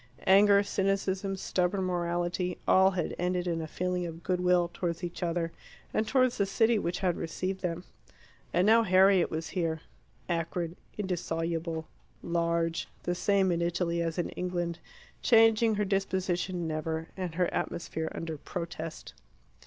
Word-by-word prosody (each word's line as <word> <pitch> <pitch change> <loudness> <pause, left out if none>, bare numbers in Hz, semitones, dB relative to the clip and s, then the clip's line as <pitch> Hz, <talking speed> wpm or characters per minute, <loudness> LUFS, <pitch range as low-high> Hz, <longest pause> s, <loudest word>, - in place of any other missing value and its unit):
Anger, 200 +1 +6
cynicism, 195 -1 0
stubborn 190 0 0
morality 175 0 -1
all 190 0 +6
had 185 -3 -2
ended 180 0 0
in 170 -2 -1
a 160 - -4
feeling 180 +1 -2
of 165 0 -9
good 180 -1 0
will 180 -1 +3
towards 170 0 -3
each 175 +1 -5
other 170 -1 -1 0.4
and 215 - +1
towards 255 -2 +2
the 200 - +2
city 225 +3 +3
which 175 -1 -2
had 180 -3 +1
received 185 +3 -3
them. 175 -1 -2 0.7
And 180 +2 +3
now 225 +2 +6
Harriet 190 -2 +5
was 160 +1 -4
here 165 -4 -1 0.5
acrid, 170 0 -2 0.2
indissoluble, 165 -3 -2 0.4
large; 170 -1 0 0.2
the 175 - 0
same 190 +1 +2
in 170 0 0
Italy 170 0 0
as 165 0 -2
in 175 - -1
England 175 -2 -3 0.4
changing 225 -1 +5
her 210 0 0
disposition 185 -2 -1
never, 160 +1 -3
and 180 -4 -4
her 180 0 +1
atmosphere 160 -1 -3
under 160 -2 -5
protest. 165 0 -6
180 Hz, 145 wpm, -29 LUFS, 170-190 Hz, 0.7 s, Anger